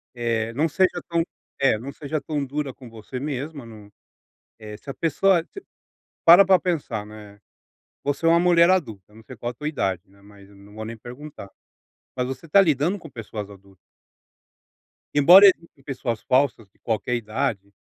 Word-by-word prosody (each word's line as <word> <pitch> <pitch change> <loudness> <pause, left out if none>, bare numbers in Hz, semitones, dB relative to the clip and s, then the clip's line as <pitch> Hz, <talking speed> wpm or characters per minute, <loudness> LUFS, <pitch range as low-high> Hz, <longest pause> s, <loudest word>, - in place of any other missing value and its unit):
É, 115 -2 -1
não 150 +7 +1
seja 185 +4 +1
tão 170 -1 0 0.4
é 135 -5 +3
não 130 +6 -8
seja 150 +2 -4
tão 150 -2 -3
dura 140 0 -4
com 125 -2 -14
você 115 +3 -8
mesma, 140 0 -5
não, 105 -3 -13 0.7
eh, 105 -1 -9
se 140 - -13
a - - -4
pessoa 170 +3 +2
te 395 - -12 0.6
para 175 +4 +8
pra 190 0 +5
pensar, 145 - -3
né, 105 -1 -13 0.6
você 145 +3 -2
é - - +6
uma 170 +1 +5
mulher 170 -1 +5
adulta, 110 - -1
não 110 - -15
sei 130 +2 -12
qual 120 +2 -4
a - - -15
tua 150 +5 -6
idade, 95 - -2
né, 100 +1 -23
mas 100 -1 -17
eu 100 - -19
não 100 +1 -17
vou 110 +1 -7
nem 115 +1 -7
perguntar. 125 -2 -11 0.7
Mas 125 -1 -2
você 130 +4 -7
está 180 +6 +5
lidando 165 +2 +1
com 165 - -12
pessoas 110 -4 -7
adultas. 100 -1 -17 1.4
Embora 175 +8 +8
existam 165 -6 0
pessoas 125 -5 -4
falsas 130 -4 +1
de - - -36
qualquer 115 +2 -2
idade, 110 -3 -3
130 Hz, 180 wpm, -23 LUFS, 110-155 Hz, 1.4 s, para